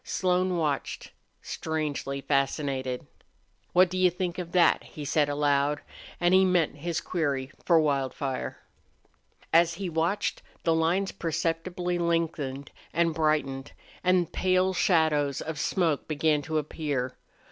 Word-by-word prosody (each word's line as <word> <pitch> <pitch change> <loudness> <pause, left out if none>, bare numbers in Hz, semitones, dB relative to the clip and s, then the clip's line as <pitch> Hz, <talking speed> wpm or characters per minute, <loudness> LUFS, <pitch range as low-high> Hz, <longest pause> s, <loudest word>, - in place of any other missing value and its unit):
Slone 185 -1 +1
watched, 150 -4 -2 0.3
strangely 150 -3 -3
fascinated. 135 -2 -1 0.7
"What 185 +1 +6
do 185 +1 -3
you 185 0 +5
think 180 0 -3
of 175 -2 -5
that?" 180 -2 +4
he 150 - -8
said, 145 0 +2
aloud, 145 0 +1 0.4
and 175 +1 +3
he 190 0 +7
meant 180 -5 +2
his 170 +3 -2
query 140 -7 -2
for 170 -2 +5
Wildfire. 135 -2 -1 1.0
As 170 0 +5
he 195 -1 -4
watched 170 +6 0 0.2
the 165 - +3
lines 170 +4 +1
perceptibly 170 +2 -2
lengthened 160 -5 -1 0.2
and 170 -1 +2
brightened 150 -4 0 0.3
and 180 -2 +2
pale 185 0 +2
shadows 155 -6 +2
of 160 -1 -5
smoke 165 -5 0
began 155 -1 +1
to 155 +2 -2
appear. 145 -4 -2
160 Hz, 125 wpm, -27 LUFS, 145-175 Hz, 1.0 s, he